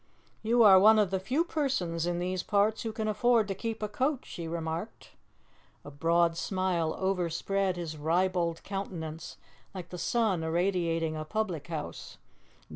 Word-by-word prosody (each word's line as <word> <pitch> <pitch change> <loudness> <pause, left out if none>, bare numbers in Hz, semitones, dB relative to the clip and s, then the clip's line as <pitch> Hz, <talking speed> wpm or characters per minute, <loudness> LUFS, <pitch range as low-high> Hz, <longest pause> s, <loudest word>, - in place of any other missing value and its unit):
"You 230 +2 +4
are 195 -3 +8
one 215 +3 +7
of 205 -4 +2
the 190 - 0
few 260 - 0
persons 185 - -1
in 175 0 -1
these 180 +1 -2
parts 210 +3 +1
who 225 - -3
can 220 0 -3
afford 220 +1 +3
to 195 - -2
keep 220 +3 -5
a - - 0
coach," 260 +6 -1
she 170 -1 -7
remarked. 165 +4 -5 0.7
A 145 - -8
broad 165 +3 +2
smile 180 -3 -1
overspread 190 +1 -1
his 160 -3 -5
ribald 170 +2 0
countenance, 170 -5 -6 0.4
like 180 -2 -7
the 180 - -7
sun 215 -8 +1
irradiating 165 -1 0
a 155 - -4
public 180 -3 -3
house. 160 -3 -6
185 Hz, 155 wpm, -29 LUFS, 165-210 Hz, 0.7 s, are